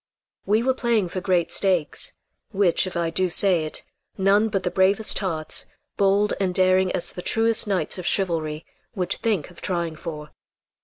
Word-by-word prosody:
We 215 +3 +2
were 260 +1 +2
playing 235 -7 0
for 185 - -4
great 180 -3 +1
stakes, 180 -6 -1 0.4
which, 190 -3 +1
if 180 - -5
I 170 -1 -1
do 185 +2 +1
say 175 -2 +3
it, 155 - -4 0.3
none 200 +3 +3
but 195 -3 -2
the 180 - -1
bravest 195 +3 +2
hearts, 165 -6 -2 0.3
bold 200 +1 +2
and 185 -2 -1
daring 185 0 +3
as 175 - -2
the 180 - -6
truest 225 +3 +2
knights 190 -1 -1
of 180 - -3
chivalry, 160 -5 0 0.3
would 180 -2 -2
think 205 -8 -2
of 175 - -15
trying 170 -3 -2
for. 155 -2 -8
185 Hz, 170 wpm, -23 LUFS, 170-200 Hz, 0.4 s, say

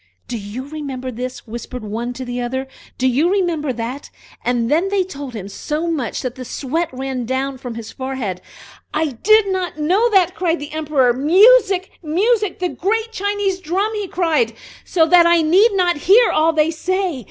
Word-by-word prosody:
"Do 245 - -4
you 220 +5 -6
remember 275 -4 -5
this?" 250 +2 -6
whispered 240 +1 -7
one 225 +3 -4
to 255 +1 -7
the 245 0 -4
other, 260 +2 -3 0.3
"Do 260 - +1
you 280 +7 +2
remember 340 -7 0
that?" 245 +4 -5 0.3
and 240 -1 0
then 340 +6 +2
they 395 -1 +1
told 285 -8 -8
him 195 -3 -6
so 300 +10 -3
much 275 -7 -3
that 250 -2 -3
the 255 - -8
sweat 300 +7 -2
ran 260 -2 -4 0.3
from 245 -2 -7
his 225 -1 -7
forehead. 260 -9 -4 0.5
"I 310 0 +1
did 400 - +3
not 370 -4 -2
know 370 +10 +2
that!" 370 -4 +3
said 345 -2 +1
the 290 -1 -8
Emperor. 295 -5 +2
"Music! 380 - +4
music! 400 +5 +1
the 360 -1 -1
great 445 +6 -1
Chinese 405 -2 -1
drum!" 380 +6 -1
he 415 -2 -3
cried, 350 +4 +1 0.3
"so 330 -3 +2
that 345 +1 +6
I 340 -1 +4
need 390 +8 +4
not 360 -4 +2
hear 415 +10 +5
all 315 +1 +3
they 310 0 +2
say!" 365 -1 -2
310 Hz, 180 wpm, -19 LUFS, 255-375 Hz, 0.5 s, that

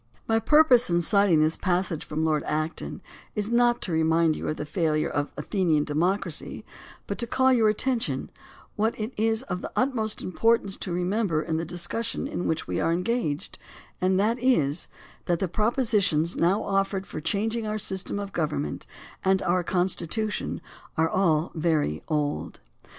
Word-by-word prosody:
My 225 0 +3
purpose 280 -4 +5
in 170 0 +3
citing 200 -4 +4
this 155 +1 +2
passage 180 -3 0
from 155 +1 -2
Lord 155 -2 +2
Acton 155 +1 -3 0.3
is 210 +1 -2
not 240 0 +3
to 185 - -3
remind 160 0 +3
you - - -5
of 155 - -2
the 150 - -4
failure 155 -1 0
of 145 0 -1
Athenian 165 -7 +1
democ 180 +7 +1
racy, 165 -5 -5 0.4
but - - -5
to 235 - -2
call 260 +2 +3
to - - +5
your 225 -3 +4
attention, 215 - -1 0.4
what 220 +2 0
it 220 +4 -3
is 225 +2 +1
of 180 -6 -4
the - - -6
utmost 235 -5 -1
importance 215 0 +2
to 185 - -5
remember 180 -2 0
in 160 -1 -1
the 165 - -2
discussion 220 - -3
in 180 - -3
which 160 - -1
we - - -2
are 165 - +1
engaged, 180 -3 -2 0.4
and 185 +1 +2
that 225 +4 +1
is 165 - +2 0.4
that 175 - +1
the 190 - -1
proposi 220 - +1
tions 160 -1 +1
now 185 +5 +2
offered 195 0 0
for 155 - -6
changing 220 +6 -1
our 215 0 -1
system 195 -1 -2
of 200 -1 -5
govern 155 -4 -1
ment 75 - -5 0.4
and 190 0 +2
our 180 0 +1
Constitution 185 +4 -1 0.4
are 160 +1 +3
all 170 -4 +2
very 155 - 0
old. 150 -1 -2
185 Hz, 175 wpm, -26 LUFS, 160-220 Hz, 0.4 s, purpose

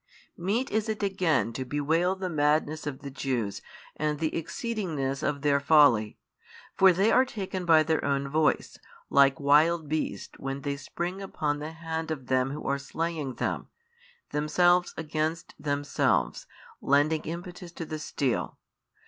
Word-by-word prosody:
Meet 210 +9 -1
is 220 +1 0
it 215 -1 -2
again 180 - +1
to 130 - -3
bewail 160 +7 +1
the 190 -1 -4
madness 155 -1 +1
of 135 -2 -5
the 140 - -6
Jews 125 -6 -2 0.3
and 150 -1 -1
the 155 +1 -1
exceedingness 165 - -3
of 140 -1 -2
their 140 -1 +3
folly. 140 -8 +4 0.6
For 190 -1 +7
they 195 +5 +2
are 255 - +6
taken 190 -6 -5
by 160 -2 +6
their 160 0 0
own 140 0 0
voice, 155 +2 0 0.3
like 140 +2 +5
wild 155 +3 +4
beasts 155 +1 -3
when 135 +1 -4
they 140 0 -2
spring 175 +6 -5
upon 150 -6 -2
the 155 +2 -6
hand 160 0 -4
of 145 -5 -4
them 130 0 +1
who 145 +2 -6
are 140 +1 0
slaying 155 -1 -3
them, - - -2 0.6
themselves 175 +4 +2
against 160 +1 -2
themselves 145 -1 0 0.3
lending 145 +3 +3
impetus 175 +2 -7
to 165 - -6
the 155 0 -5
steel. 140 -5 -2
155 Hz, 150 wpm, -28 LUFS, 140-170 Hz, 0.6 s, For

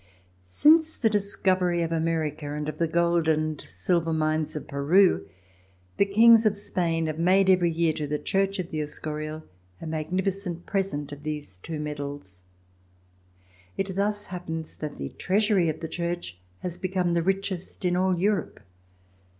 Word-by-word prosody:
Since 315 - +4
the 225 -3 +2
discovery 185 -4 +1
of 165 - -3
America 160 -3 -1
and 150 0 -3
of 155 0 -5
the 165 - +2
gold 170 0 +2
and 155 -1 0
silver 165 - -1
mines 155 0 0
of 150 - -5
Peru, 145 - +3 0.7
the 200 - +3
Kings 225 +3 +7
of 210 -2 +2
Spain 165 -4 -1
have 155 0 -3
made 190 +2 +4
every 175 -2 +3
3^ear, 165 -1 +1
to 150 -2 -2
the 150 +1 -1
Church 195 +4 0
of 180 -2 -4
the 155 -2 -2
Escurial, 155 +1 -5 0.4
a - - -8
mag 155 -1 -3
nificent 185 -2 -2
present 190 -8 -2
of 145 0 -8
these 150 -11 -6
two 155 - -6
metals. 145 -10 -6 1.4
It 195 -1 -2
thus 205 +1 0
happens 165 -3 -6
that 150 -1 -6
the 70 -1 -4
Treasury 200 -2 +1
of 155 - -4
the 165 - -3
Church 170 - -4 0.2
has 175 -1 -4
become 185 -2 0
the 170 - +2
richest 190 0 -2
in 175 0 +2
all 185 0 +2
Europe. 195 -1 0
170 Hz, 160 wpm, -26 LUFS, 155-190 Hz, 1.4 s, Kings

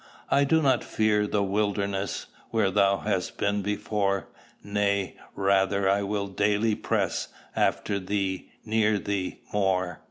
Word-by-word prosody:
I 140 +1 +4
do 160 +2 +3
not 130 -3 +3
fear 105 -1 +1
the 105 -1 +1
wilderness 100 0 -1 0.2
Where 110 -4 +2
thou 100 0 +3
hast 100 -4 -2
been 100 0 +1
before; 100 -1 -1 0.3
Nay, 100 -1 0 0.2
rather 100 0 +2 0.2
will 100 -1 -1
I 95 - -13
daily 105 +2 +2
press - - -1 0.3
After 100 -1 +1
thee, 95 -1 -2 0.2
near 110 -1 +2
thee, 95 0 -3
more. 95 -3 +1
100 Hz, 130 wpm, -27 LUFS, 100-105 Hz, 0.3 s, I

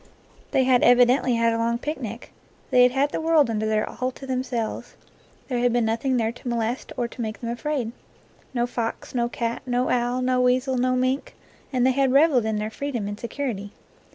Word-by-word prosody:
They 260 - +2
had 255 -1 +4
evidently 245 +1 +5
had 230 0 +2
a 230 - -1
long 235 +1 +1
picnic. 240 -5 -6 0.4
They 250 - +6
had 250 0 +6
had 275 +3 +1
the - - -2
world 320 -6 +3
under 215 0 -1
there 215 0 +1
all 255 +1 -3
to 265 +1 -10
themselves. 255 -3 -3 0.5
There 250 -3 -1
had 245 0 +2
been 240 -1 +2
nothing 230 +4 0
there 225 -1 +1
to 245 - -11
molest 235 +1 -2
or 240 -1 0
to 235 - -9
make 220 -1 -4
them 235 -1 -4
afraid, 240 -1 -2 0.6
no 240 -2 0
fox, 235 -2 -4
no 240 -1 0
cat, 235 0 -3
no 250 0 0
owl, 245 +1 0
no 255 0 +2
weasel, 255 +1 +2
no 255 +1 +1
mink, 255 +2 -1 0.4
and 255 -2 +2
they 260 - +5
had 265 0 +2
reveled 275 -5 +4
in 220 -1 0
their 210 +1 -3
freedom 245 -4 -3
and 205 +1 -5
security. 230 -5 -4
245 Hz, 205 wpm, -24 LUFS, 230-255 Hz, 0.6 s, They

